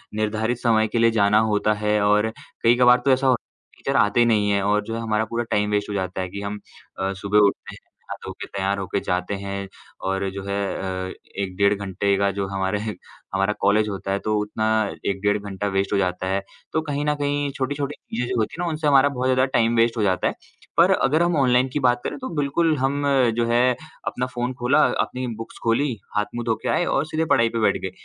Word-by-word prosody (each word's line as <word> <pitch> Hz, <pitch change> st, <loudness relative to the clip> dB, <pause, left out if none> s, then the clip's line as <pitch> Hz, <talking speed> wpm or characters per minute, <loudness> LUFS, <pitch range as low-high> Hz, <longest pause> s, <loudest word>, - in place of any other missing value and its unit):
निर्धारित 110 Hz, +2 st, -1 dB
समय 110 Hz, -2 st, +3 dB
के 115 Hz, -, -3 dB
लिए 115 Hz, 0 st, +5 dB
जाना 105 Hz, -1 st, +4 dB
होता 105 Hz, +1 st, +2 dB
है। 105 Hz, 0 st, +2 dB
और 105 Hz, +2 st, +3 dB, 0.3 s
कई 115 Hz, +1 st, +5 dB
कभार 125 Hz, 0 st, +6 dB
तो 135 Hz, -, +4 dB
ऐसा 130 Hz, +1 st, +2 dB
होता 125 Hz, -2 st, +3 dB
है, -, -, -30 dB
टीचर -, -, -1 dB
आते 120 Hz, +4 st, +3 dB
नहीं 105 Hz, -3 st, +2 dB
हैं 100 Hz, -1 st, +2 dB
और 105 Hz, +1 st, +2 dB
जो 115 Hz, -, -4 dB
है 115 Hz, -, -3 dB
हमारा 110 Hz, -1 st, 0 dB
पूरा 115 Hz, +2 st, -2 dB
टाइम 105 Hz, 0 st, +1 dB
वेस्ट 105 Hz, 0 st, 0 dB
हो -, -, -3 dB
जाता 95 Hz, -1 st, -2 dB
है। 90 Hz, -, -4 dB
कि 100 Hz, +2 st, -6 dB
हम 105 Hz, +1 st, -4 dB, 0.4 s
अ, 95 Hz, 0 st, -1 dB
सुबह 100 Hz, +2 st, +1 dB
उठते -, -, -5 dB
हैं, -, -, -13 dB, 0.3 s
नहा-धोके -, -, -7 dB
तैयार 100 Hz, 0 st, -1 dB
होकर 100 Hz, +1 st, -2 dB
जाते 90 Hz, +2 st, -1 dB
हैं 100 Hz, 0 st, -5 dB, 0.4 s
और 95 Hz, 0 st, -1 dB
जो 100 Hz, 0 st, -6 dB
है 100 Hz, 0 st, -3 dB, 0.5 s
अ, -, -, -7 dB, 0.2 s
1 95 Hz, -2 st, -3 dB
डेढ़ 100 Hz, 0 st, +4 dB
घंटे 100 Hz, 0 st, 0 dB
का 100 Hz, 0 st, +2 dB
जो 100 Hz, 0 st, -3 dB
हमारे 95 Hz, +1 st, -1 dB, 0.5 s
हमारा 95 Hz, +2 st, +1 dB
कॉलेज 105 Hz, +2 st, +3 dB
होता 95 Hz, 0 st, -4 dB
है, 100 Hz, -, 0 dB
तो 110 Hz, 0 st, -1 dB
उतना 110 Hz, +1 st, -3 dB, 0.4 s
1 100 Hz, -1 st, -1 dB
डेढ़ 105 Hz, 0 st, +2 dB
घंटा 100 Hz, 0 st, -4 dB
वेस्ट 95 Hz, +1 st, 0 dB
हो -, -, +3 dB
जाता 90 Hz, -1 st, -1 dB
है। 95 Hz, +1 st, 0 dB, 0.3 s
तो 160 Hz, -, +2 dB
कहीं 145 Hz, -2 st, -3 dB
न 150 Hz, -, +2 dB
कहीं 145 Hz, 0 st, -1 dB
छोटी-छोटी 140 Hz, +2 st, -2 dB
चीज़ें 120 Hz, +2 st, -4 dB
होती 110 Hz, -, -1 dB
हैं -, -, -1 dB
ना, -, -, -1 dB
उनसे 155 Hz, -1 st, -2 dB
हमारा 140 Hz, 0 st, +5 dB
बहुत 130 Hz, -1 st, -2 dB
ज़्यादा 130 Hz, 0 st, +3 dB
टाइम 115 Hz, 0 st, +2 dB
वेस्ट 115 Hz, +1 st, +3 dB
हो -, -, 0 dB
जाता 95 Hz, -3 st, +1 dB
है। -, -, -1 dB, 0.4 s
पर -, -, +6 dB
अगर 155 Hz, +5 st, +3 dB
हम 175 Hz, -1 st, +1 dB
ऑनलाइन 125 Hz, -1 st, +3 dB
की 150 Hz, -, 0 dB
बात 125 Hz, -2 st, +2 dB
करें, -, -, -4 dB
तो 260 Hz, -, -5 dB
बिल्कुल 150 Hz, +3 st, +1 dB
हम 135 Hz, +2 st, 0 dB, 0.3 s
जो 120 Hz, -1 st, +1 dB
है 120 Hz, +1 st, +3 dB, 0.3 s
अपना 125 Hz, -, -1 dB
फ़ोन 120 Hz, +1 st, -2 dB
खोला, 140 Hz, +5 st, +4 dB, 0.2 s
अपनी 130 Hz, 0 st, -3 dB
बुक्स 115 Hz, -, -9 dB
खोलीं, 120 Hz, +2 st, +1 dB, 0.2 s
हाथ-मुँह 115 Hz, +3 st, -2 dB
धो 110 Hz, -1 st, +1 dB
के -, -, -1 dB
आए 175 Hz, -, +2 dB
और 145 Hz, -, +1 dB
सीधे 160 Hz, +1 st, -1 dB
पढ़ाई 115 Hz, 0 st, +3 dB
पे 115 Hz, -, -3 dB
बैठ 100 Hz, -3 st, +2 dB
गए। 95 Hz, -, -4 dB
110 Hz, 230 wpm, -23 LUFS, 100-125 Hz, 0.5 s, कभार